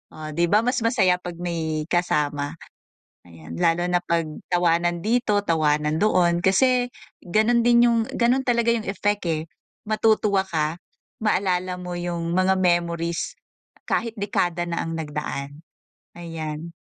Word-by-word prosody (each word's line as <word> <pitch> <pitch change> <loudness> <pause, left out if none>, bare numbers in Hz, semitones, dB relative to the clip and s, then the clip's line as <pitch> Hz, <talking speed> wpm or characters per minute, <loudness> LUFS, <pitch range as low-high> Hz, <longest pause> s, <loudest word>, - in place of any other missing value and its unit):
oh, 155 0 -7
di 170 +3 +1
ba 210 +5 +4
mas 250 +2 0
masaya 185 -6 +3
'pag 175 -1 -7
may 160 -3 -2
kasama. 150 -4 0 0.7
Ayan, 80 -1 -10
lalo 165 +1 +2
na 180 - +3
'pag 170 -1 0 0.2
tawanan 175 -1 +1
dito, 215 -2 +1
tawanan 155 -3 +1
doon. 180 -4 +3
Kasi 245 +7 +3 0.4
gano'n 225 +6 +2
din 240 0 +6
yun 235 - +2 0.2
gano'n 250 +3 +2
talaga 235 -1 +2
yung 230 -2 -1
effect, 205 0 -1
eh, 160 -2 0 0.5
matutuwa 215 -3 +2
ka, 160 -2 -1 0.4
maalala 185 -4 0
mo 180 -1 -6
yung 170 -1 -3
mga 185 +2 +3
memories 170 -2 0 0.5
kahit 230 -1 0
dekada 175 -4 -1
na 170 - -2
ang 165 - -4
nagdaan. 150 -1 -5 0.5
Ayan. 165 -1 -6
175 Hz, 135 wpm, -23 LUFS, 165-205 Hz, 0.7 s, din